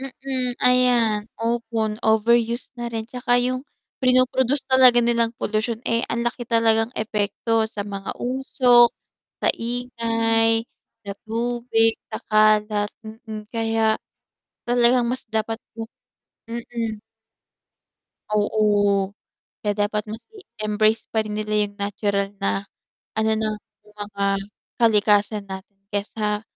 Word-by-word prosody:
Mm, 260 -2 -2
ayan, 245 -4 +4 0.2
opo, 230 0 -1 0.3
overuse 235 +2 +2
na 235 - -2
rin 225 -1 -4
tsaka 245 +1 -3
yung 255 0 -1 0.4
prino 255 -1 +5
produce 260 +2 0
talaga 260 -2 +6
nilang 235 -1 +1
polusyon, 220 +2 -2
eh, 230 0 +1
ang 235 +1 -1
laki 240 0 -3
talagang 225 -1 +3
epekto 220 +1 0
sa 205 -2 -5
mga 200 -1 -6
usok 245 -1 +4 0.5
sa - - +2
ingay, 230 -1 0 0.4
sa 200 - -4 0.2
tubig, 230 0 +1 0.2
sa - - -5
kalat, 215 -1 +3 0.2
mm, 220 -1 -8
kaya 225 -1 +1 0.7
talagang 240 0 +3
mas 255 +2 -3
dapat 220 0 -1 0.2
po 225 -1 -7 0.6
mm. 230 -2 -4 1.3
Oo, 205 -2 +2 0.5
kaya 205 -1 0
dapat 210 0 -2
mas 225 +2 -7
i 410 - -11 0.2
embrace 215 +1 +2
pa 220 - +3
rin 210 -1 -5
nila 215 0 -3
yung 205 - -17
natural 200 0 -1
na 195 0 -1 0.5
ano, 220 0 +1
ng 215 -1 -1 0.3
yung 210 0 -21
mga 200 -1 -4 0.6
kalikasan 210 -2 +3
natin, 195 +1 -9 0.2
kaysa 210 +1 -2
225 Hz, 120 wpm, -23 LUFS, 210-240 Hz, 1.3 s, talaga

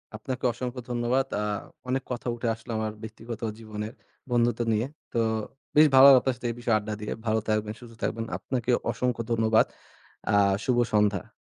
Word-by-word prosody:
আপনাকে 125 +4 -5
অসংখ্য 125 +1 -5
ধন্যবাদ। 120 +2 +1 0.2
আ - - -1 0.4
অনেক 130 +1 0
কথা 125 0 -4
উঠে 120 0 -3
আসলো 115 +1 -10
আমার 110 0 -1
ব্যক্তিগত 115 +1 -7 0.2
জীবনের, 110 0 -6 0.4
বন্ধুত্ব 120 -1 +2
নিয়ে। 110 +3 +1 0.3
তো - - -1 0.6
বেশ 155 +1 +8
ভালো 130 - +9
লাগলো 135 -2 +9
আপনার 130 -2 0
সাথে 125 - -4
এই - - -7
বিষয়ে 120 -2 +2
আড্ডা 105 0 -4
দিয়ে। 105 - -4
ভালো 110 0 +2
থাকবেন, 110 0 0
সুস্থ 120 -2 -12
থাকবেন। 115 0 -1
আপনাকে 125 -2 -2 0.2
অসংখ্য 125 -2 -1
ধন্যবাদ। 110 -1 +4 0.7
আ - - +2 0.3
শুভ 125 - +2 0.2
সন্ধ্যা। 105 0 +2
115 Hz, 175 wpm, -27 LUFS, 110-125 Hz, 0.7 s, ভালো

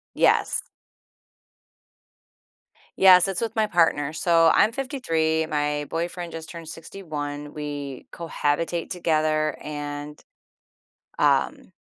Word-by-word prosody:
Yes. - - +2 2.3
Yes, 185 -1 +7
it's 195 -2 -2
with 225 -1 -3
my 215 -1 +3
partner. 160 -5 +2
So, 165 0 +4
I'm 215 - +4
53, 165 - -1
my 150 -1 -1
boyfriend 170 +1 -4
just 160 -1 -8
turned 170 -2 -9
61, 150 -4 -6
we 145 -3 -6
cohabitate 165 +1 -2
together, 155 -3 0
and, 145 0 -6 1.0
um, - - +1
160 Hz, 95 wpm, -24 LUFS, 150-175 Hz, 2.3 s, Yes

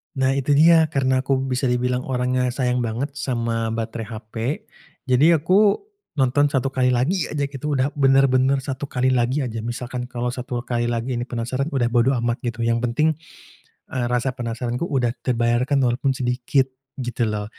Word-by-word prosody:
Nah, 135 -1 +2
itu 140 +1 +1
dia, 160 +1 +6
karena 130 -3 +1
aku 135 +1 +1 0.2
bisa 130 +1 0
dibilang 125 0 0
orangnya 125 0 0
sayang 125 0 0
banget 120 +4 -2
sama 115 -4 -1
baterai 115 -1 -4
HP, 110 -1 -10 0.7
jadi 140 +6 +4
aku 200 +4 +4 0.4
nonton 145 +1 +3
1 135 -2 -1
kali 130 -1 +1
lagi 130 +9 +1
aja 145 -1 -2
gitu, 140 +1 -3
udah 135 +2 +1
benar-benar 135 0 +4
1 135 +1 -4
kali 130 0 +1
lagi 130 +3 +1
aja. 115 -3 -4
Misalkan 120 +2 -5
kalau 125 -1 -3
1 125 -1 -4
kali 120 -1 -1
lagi 120 +1 -2
ini 120 - -4
penasaran, 125 +3 -2
udah 130 -6 0
bodo 120 +3 +3
amat 120 0 0
gitu, 115 0 -3
yang 115 0 +1
penting, 125 +7 +1 0.8
eee, 125 -2 0
rasa 125 +1 0
penasaranku 120 +4 -3
udah 125 -4 +1
terbayarkan 120 +2 +1
walaupun 130 +2 0
sedikit, 125 +2 +1 0.3
gitu 120 -3 -1
loh. 105 -1 -3
125 Hz, 165 wpm, -22 LUFS, 120-135 Hz, 0.8 s, dia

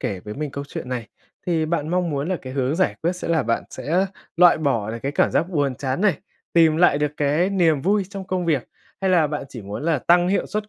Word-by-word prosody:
kể 95 -3 -3
với 105 +3 -8
mình 150 0 -4
câu 140 +1 -5
chuyện - - -6
này, 125 -3 -4 0.4
thì 165 -3 +1
bạn 155 -2 -1
mong 180 0 0
muốn 145 +1 -2
là 185 - 0
cái 130 - -7
hướng 135 +2 0
giải 185 - +1
quyết 170 +3 +1
sẽ 180 - -5
là 160 -4 +2
bạn 115 0 -1
sẽ 180 +6 0 0.3
loại 175 -1 +6
bỏ 115 -9 0
được 115 - -5
cái 140 +1 -2
cảm - - +2
giác 170 - +1
buồn 145 -6 0
chán 130 +3 -3
này, 200 -6 +2 0.3
tìm 165 -2 +5
lại 165 -4 +4
được 150 -1 0
cái 150 +6 +1
niềm 165 -7 +2
vui 200 +2 +2
trong 195 -1 -7
công 185 -1 -1
việc, 145 -7 0 0.3
hay 190 -1 +1
là 170 -4 +4
bạn 150 -1 -4
chỉ 120 -6 -9
muốn 100 +7 -6
là 160 -4 +2
tăng 175 +5 +3
hiệu 195 - +1
suất 210 0 -4
155 Hz, 260 wpm, -22 LUFS, 140-180 Hz, 0.4 s, loại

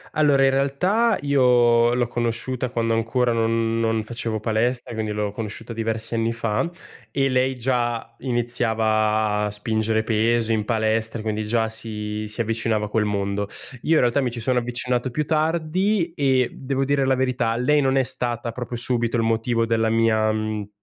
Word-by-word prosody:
Allora, 145 -3 +4
in 135 - +5
realtà 180 +13 +2
io 120 -4 +4
l'ho 125 -1 +1
conosciuta 120 +2 -2
quando 115 -1 0
ancora 120 +2 +1
non 115 0 0
non 115 -1 0
facevo 115 -1 -3
palestra, 115 +2 -1
quindi 110 -1 -3
l'ho 105 -1 -2
conosciuta 110 +2 -6
diversi 115 0 -3
anni 115 0 0
fa. 115 +7 -1 0.4
E 135 +2 +1
lei 130 0 +1
già 120 -2 -1
iniziava 110 -4 +1
a - - -1
spingere 110 +1 0
pesi 115 +1 +1
in 105 -2 0
palestra, 110 0 0
quindi 110 -1 -2
già 110 0 +1
si 105 -1 -5
si 105 +3 -4
avvicinava 110 -1 -1
a - - -13
quel 105 -1 +1
mondo. 100 0 -1 0.4
Io 165 - +2
in - - +5
realtà 125 +3 +2
mi 125 -4 0
ci 120 - -6
sono 125 +1 +1
avvicinato 125 +1 -1
più 150 +4 -1
tardi 165 +4 0
e 130 -5 +2
devo 135 0 -2
dire 140 0 +1
la 130 0 +3
verità, 125 -3 0
lei 140 +5 +2
non 135 -1 +2
è 135 - +3
stata 120 -2 -3
proprio 125 0 -6
subito 120 -1 0
il 115 - +1
motivo 115 +1 +1
della 115 -1 +1
mia, 110 -1 +2
mhmm, 110 -1 -3
115 Hz, 175 wpm, -23 LUFS, 110-130 Hz, 0.4 s, in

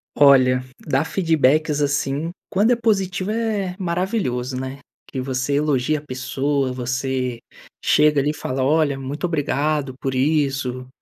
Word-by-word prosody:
Olha, 130 -3 +5 0.2
dar 140 0 0
feedbacks 155 -4 +2
assim, 145 +2 0 0.2
quando 205 +5 +2
é 245 - +5
positivo 195 -4 0
é 215 -5 -1
maravilhoso, 170 - -1
né, 130 +1 -5 0.3
Que 135 - -5
você 130 +1 -2
elogia 145 0 +1
a 145 - -7
pessoa, 135 +1 -1
você 125 0 -2 0.4
chega 150 -1 +4
ali 145 - 0
e - - -7
fala: 130 -2 -3
"Olha, 145 0 +2
muito 140 +6 -4
obrigado 145 -3 -1
por 135 -1 -2
isso, 135 -3 0
145 Hz, 135 wpm, -21 LUFS, 130-160 Hz, 0.4 s, Olha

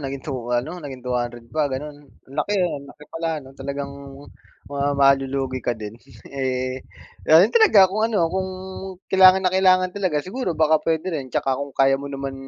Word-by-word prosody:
naging 135 -1 -6
two 130 -5 -5
ano 160 +9 -4
naging 135 -5 -9
200 120 -1 -3
pa 155 -2 +1
ganun? 145 +1 -7 0.2
Ang 135 - -15
laki 205 +7 -1
ang 140 -5 -4
laki 150 +1 -14
pala 165 0 -3 0.2
ano 135 - -14
talagang, 140 +1 -5 0.7
mukhang 140 0 -1
malulugi 135 -1 +2
ka 120 -2 -2
din, 105 -1 -7 0.4
eh, 130 -1 -2 0.5
ayun 170 +8 +6
talaga 405 - +7
kung 200 +3 -3
ano, 205 -7 +1
kung 190 0 -1 0.6
kailangan 190 0 +6
na 185 - +2
kailangan 185 -1 +3
talaga 185 -7 -1
siguro 190 -3 -3
baka 155 -1 +3
pwede 160 0 -1
rin 140 -5 -4
tsaka 140 -2 0
kung 140 0 -5
kaya 135 0 +4
mo 140 - -6
naman 135 -1 -5
140 Hz, 180 wpm, -22 LUFS, 135-180 Hz, 0.7 s, talaga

